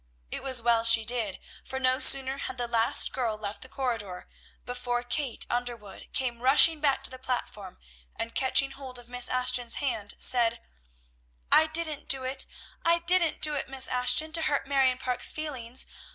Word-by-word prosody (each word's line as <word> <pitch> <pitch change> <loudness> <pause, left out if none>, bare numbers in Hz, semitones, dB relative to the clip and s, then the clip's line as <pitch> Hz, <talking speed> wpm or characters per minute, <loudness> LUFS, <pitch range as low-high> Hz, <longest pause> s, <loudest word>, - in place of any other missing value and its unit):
It - - -5
was 260 -3 0
well 230 -1 +2
she 230 -1 +6
did; 230 -4 -1 0.3
for 265 - -7
no 255 0 +1
sooner 270 0 +4
had 260 - -6
the 240 -1 -3
last 230 -1 +5
girl 230 -4 -3
left 210 -1 -6
the 260 - -10
corridor, 225 -10 -5 0.4
before 245 -1 -4
Kate 260 0 -3
Underwood 240 -4 -6
came 240 -3 -3
rushing 295 +5 +5
back 285 -2 0
to - - 0
the 255 - -11
platform, 230 -7 -6 0.4
and 230 - -6
catching 270 +1 +2
hold 265 -2 -10
of 245 -1 -14
Miss 245 0 -1
Ashton's 250 -1 -1
hand 230 -8 -4
said, 235 -2 +2 0.9
"I 315 - +5
didn't 315 -2 -2
do 265 -1 -1
it, 265 +1 0 0.4
I 335 0 +3
didn't 340 -1 0
do 300 - +2
it, 280 - -5
Miss 265 -1 +2
Ashton, 250 +5 +2
to 325 +1 +2
hurt 295 -3 -1
Marion 270 -2 +1
Parke's 255 -1 +1
feelings! 260 -5 -5
255 Hz, 175 wpm, -27 LUFS, 235-275 Hz, 0.9 s, she